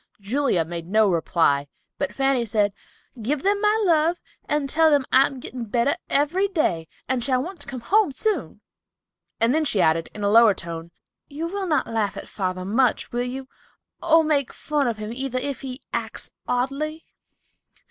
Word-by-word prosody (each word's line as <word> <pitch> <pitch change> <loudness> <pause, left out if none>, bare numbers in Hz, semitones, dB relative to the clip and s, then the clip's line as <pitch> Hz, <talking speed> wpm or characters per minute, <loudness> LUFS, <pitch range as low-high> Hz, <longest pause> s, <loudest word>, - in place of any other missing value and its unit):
Julia 210 - +1
made 170 0 -6
no 215 +3 +4
reply, 160 -4 +2 0.3
but 285 - -1
Fanny 270 -2 +1
said, 210 -3 +1 0.5
"Give 275 +6 -1
them 405 +1 +2
my 425 +1 +3
love, 335 0 +3 0.3
and 295 -1 +1
tell 320 +3 +4
them 285 -3 +3
I 265 +1 +6
am 270 - -8
getting 245 -1 -6
better 235 +5 +1
every 325 +8 +2
day, 180 - 0 0.2
and 255 -2 0
shall 255 -1 +1
want 370 +3 -8
to - - -11
come 255 -3 -6
home 395 - +3
soon," 425 +10 -2 0.8
and 230 +3 +3
then 315 +1 +2
she 220 -9 0
added, 165 -1 +2
in 210 - -5
a 200 - +2
lower 225 -2 +7
tone, 165 -1 -7 0.4
"You 300 +3 -5
will 385 +2 -3
not 305 -3 +1
laugh 210 -3 -1
at - - -7
father 185 -2 -3
much, 235 +4 +1
will 240 - -1
you, 260 +2 -4 0.5
or 325 -1 +5
make 290 -4 +1
fun 295 -3 -1
of 230 -2 -1
him 215 +1 -5
either, 260 0 -3
if 275 +1 -3
he 260 0 -7
acts - - -4 0.2
oddly?" 280 +6 -2
260 Hz, 180 wpm, -24 LUFS, 215-300 Hz, 0.8 s, lower